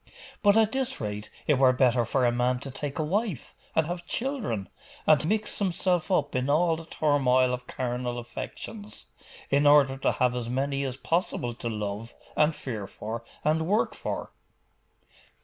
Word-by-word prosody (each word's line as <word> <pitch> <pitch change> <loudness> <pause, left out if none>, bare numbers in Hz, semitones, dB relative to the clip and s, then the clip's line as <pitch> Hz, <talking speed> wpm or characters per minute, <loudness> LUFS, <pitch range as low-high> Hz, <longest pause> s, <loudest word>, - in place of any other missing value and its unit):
'But 205 +1 +5
at 220 -1 +4
this 265 0 -1
rate, 105 0 -4 0.2
it 145 -4 +3
were 130 -1 +6
better 125 -2 +3
for 125 +2 +1
a 120 - +4
man 125 +1 +1
to 135 - -7
take 140 +2 -5
a 155 - 0
wife, 190 - -2 0.2
and 160 - +3
have 175 +1 -5
children, 230 - -1 0.4
and 155 0 +4
mix 215 +3 0
himself 180 -2 0
up 145 -6 +1
in 130 +2 0
all 165 +3 +3
the 165 0 -8
turmoil 130 -5 +2
of 125 0 -5
carnal 125 -1 -3
affections, 205 - -7 0.5
in 140 +1 +4
order 140 -2 +6
to 135 - +1
have 125 -1 +1
as 120 -2 -3
many 140 +2 -1
as 130 -1 -4
possible 160 -7 -1
to 115 0 -5
love, 105 +1 -4 0.2
and 150 +1 +3
fear 110 -7 -5
for, 115 +4 -6 0.2
and 160 +1 +2
work 210 +4 +2
for. - - -4
140 Hz, 170 wpm, -27 LUFS, 125-170 Hz, 0.5 s, were